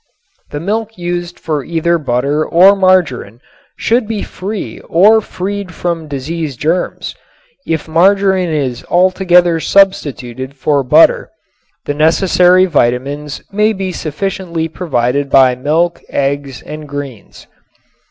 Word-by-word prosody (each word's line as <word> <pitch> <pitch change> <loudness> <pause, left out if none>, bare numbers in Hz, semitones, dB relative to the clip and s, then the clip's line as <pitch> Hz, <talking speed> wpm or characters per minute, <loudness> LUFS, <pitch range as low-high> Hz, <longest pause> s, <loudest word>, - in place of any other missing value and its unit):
The 145 - -5
milk 220 +5 -3
used 175 0 -4
for 150 -3 -3
either 170 +2 0
butter 140 +2 0
or 185 +5 +5
margarin 175 - +1 0.4
should 235 -1 0
be 215 -2 -3
free 200 +2 -6
or 210 +6 +5
freed 195 -2 -5
from 170 -3 -3
disease 145 0 -5
germs. 165 +8 -2 0.5
If 160 -1 -2
margarin 190 +2 +2
is 135 -6 -2
altogether 180 -2 +3
substituted 140 -8 0
for 140 +1 0
butter, 125 - +4 0.6
the 145 - -2
necessary 180 +4 +3
vitamines 145 -1 -1
may 210 +2 +1
be 190 -2 -4
sufficiently 170 0 -4
provided 140 -4 -2
by 130 -2 +5
milk, 155 +7 -1
eggs 140 -1 -3
and 150 -1 -9
greens. 140 -6 -8
165 Hz, 115 wpm, -14 LUFS, 140-185 Hz, 0.6 s, or